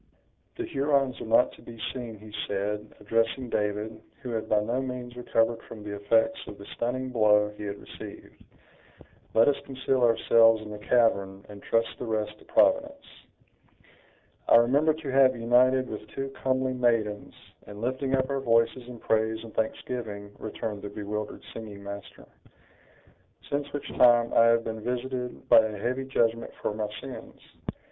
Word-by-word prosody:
"The 360 - -4
Hurons 140 - 0
are - - -6
not 115 +3 +4
to - - -16
be 115 -1 -11
seen," 120 -4 -6
he 105 +1 -13
said, 105 +1 -3
addressing 115 +4 0
David, 105 +1 -2 0.2
who 125 - -4
had 110 -1 -3
by 105 - +4
no 120 +5 -1
means 125 -2 -6
recovered 115 -1 +1
from 110 -2 -9
the 105 -1 -5
effects 115 +3 +2
of 105 - -8
the 100 - -11
stunning 130 +2 -2
blow 105 -3 +3
he 105 - -7
had 100 0 -4
received; - - -11 0.9
"let 115 - +6
us 145 - +3
conceal 135 -1 -1
ourselves 115 -1 +5
in 105 - -9
the 105 - -7
cavern, 100 -4 +1
and 100 -1 -10
trust 115 0 +1
the - - -4
rest 110 -2 -2
to - - -18
Providence." 285 0 +2 1.4
"I - - +8
remember 140 +7 +4
to 150 -4 -5
have 130 -1 +5
united 125 +2 +3
with 105 - -7
two 135 0 -5
comely 130 -1 -1
maidens, 115 -4 0 0.3
in 105 0 -9
lifting 130 +3 -1
up 130 0 +1
our 135 - 0
voices 115 0 +2
in 125 -1 -9
praise 110 0 0
and 115 - -11
thanksgiving," 110 -2 -3
returned 105 -1 -5
the 105 - -6
bewildered 105 +1 -5
singing 105 -3 -8
master; 100 0 -9 1.3
"since 145 0 -2
which 145 - -5
time 120 -1 +5
I 115 - +6
have 115 0 +4
been 110 -1 -5
visited 125 +1 -4
by - - +8
a 110 -1 0
heavy 130 +6 -2
judgment 115 -3 +1
for - - -2
my 105 0 -2
sins. 135 -2 -9
115 Hz, 165 wpm, -27 LUFS, 105-130 Hz, 1.4 s, I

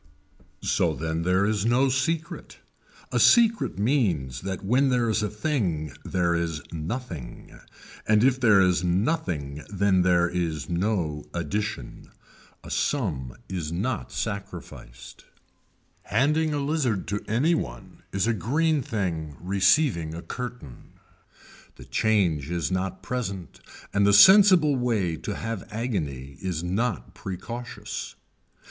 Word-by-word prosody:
So - - +1
then 80 0 -2
there 90 +3 +2
is 105 -1 0
no 120 +4 +3
secret. 155 +6 -2 0.5
A - - +1
secret 230 - +4
means 95 - 0
that 95 0 -5
when 130 +6 +3
there 125 -2 +2
is 110 - +1
a 105 - -1
thing 105 - -2
there 85 -2 0
is 85 -2 -1
nothing 80 - -6 0.5
and 105 0 +4
if 130 0 +3
there 110 -6 +5
is 90 -1 +2
nothing 85 - -1
then 100 -2 +2
there 90 -1 +3
is 85 -4 -2
no 85 -5 -1
addition. 85 - -4 0.5
A - - -9
sum 75 - -1
is 85 -5 -4
not 85 - -2
sacrificed. 70 - -7 0.8
Handing 150 +7 +2
a 150 - -1
lizard 140 - -1
to 105 +1 -2
any 130 +11 +2
one - - -5
is 100 +1 0
a 115 - +2
green 150 - +1
thing 85 - -3
receiving 95 - +2
a 85 - -7
curtain. 125 - -8 0.8
The 65 - -12
change 85 - +1
is 85 0 -2
not 95 0 -2
present 100 - -4 0.3
and 100 0 +3
the 100 - +4
sensible 185 - +7
way 110 -9 0
to 100 +5 -5
have 115 -4 -5
agony 75 - -4
is 90 -3 -3
not 100 +3 -2
precautious. 115 +3 -6
100 Hz, 125 wpm, -26 LUFS, 85-125 Hz, 0.8 s, sensible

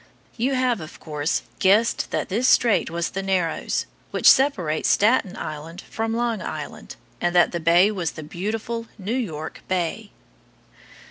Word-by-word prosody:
You 255 +4 0
have, 250 -6 +1
of 155 - -10
course, 150 -1 -2 0.2
guessed 210 +5 +3
that - - -2
this 230 +7 +1
strait 230 -8 +4
was 170 0 -2
the 195 - -3
Narrows, 185 -4 -1 0.2
which - - +1
separates 190 - +4
Staten 215 -2 +3
Island 155 +4 -6
from 225 0 -3
Long 235 -3 -1
Island, - - -7 0.3
and 175 0 0
that 175 - +5
the 170 - -2
bay 170 +5 +5
was 180 -6 -2
the 155 - -8
beautiful 225 +8 -4
New 205 +2 -3
York 160 -12 -4
Bay. 185 +4 -2
195 Hz, 150 wpm, -23 LUFS, 170-230 Hz, 0.3 s, that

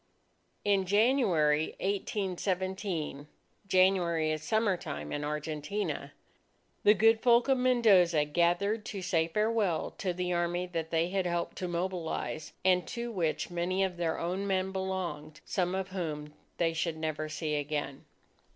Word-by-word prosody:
In 195 -2 +2
January 185 - +3
1817 190 -5 -2 0.4
January 180 -4 +3
is 155 -1 -2
summertime 185 - -1
in 145 - -2
Argentina 150 +6 -3 0.7
the 210 - +6
good 225 +2 +4
folk 240 0 +5
of 265 -2 +3
Mendoza 200 -11 +4
gathered 175 +7 +1
to 195 -3 -5
say 165 -3 +1
farewell 210 -2 0
to 185 - 0
the 180 0 -2
Army 175 +1 0
that 165 -3 -4
they 165 +1 +1
had 190 -1 0
helped 170 0 -2
to 180 - -2
mobilize, 170 -3 -3
and 180 -1 +3
to 235 -1 -4
which 170 -7 -1
so - - -11
many 180 +3 0
of 185 -2 -2
their 165 -2 -1
own 185 +4 -2
men 190 -1 0
belonged, 180 -6 -4
some 180 0 0
of 190 0 -3
whom 155 -5 -4 0.2
they 165 -1 +1
should 165 0 -2
never 155 -1 -3
see 155 0 -3
again. 145 -2 -3
180 Hz, 140 wpm, -30 LUFS, 160-195 Hz, 0.7 s, the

